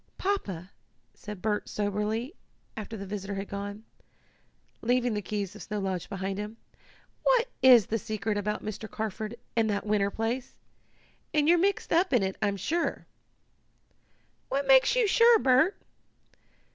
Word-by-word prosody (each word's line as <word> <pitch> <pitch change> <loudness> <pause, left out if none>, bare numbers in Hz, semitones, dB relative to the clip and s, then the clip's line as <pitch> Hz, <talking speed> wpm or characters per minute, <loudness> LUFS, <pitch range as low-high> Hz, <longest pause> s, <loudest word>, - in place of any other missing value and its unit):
"Papa," 200 - -2 0.4
said 210 -3 -9
Bert 210 -1 -1
soberly, 210 - -2 0.4
after 220 0 -6
the 200 - -6
visitor 200 0 -5
had 195 +1 -4
gone, 205 +1 -6 1.0
leaving 245 0 +1
the 210 - -1
keys 205 -1 -4
of 210 - -10
Snow 210 - -4
Lodge 190 -3 -3
behind 195 0 -3
him, 210 +2 -6 0.6
"what - - +3
is 245 -5 +8
the 225 - -1
secret 215 0 -2
about 210 +1 -2
Mr. 215 +1 -5
Carford 220 +1 -4 0.2
and 225 -1 +2
that 200 0 -1
winter 205 -1 +2
place? 230 +5 -3 0.8
And 300 -1 +3
you're 345 +1 +5
mixed 395 0 +1
up 345 0 +3
in 240 -5 +4
it, 190 0 -1
I'm 200 -1 +1
sure." 335 - -1 1.4
"What 280 +1 0
makes 265 - +6
you - - +4
sure, 465 +3 +6
Bert?" 270 +3 +3
215 Hz, 145 wpm, -28 LUFS, 200-260 Hz, 1.4 s, is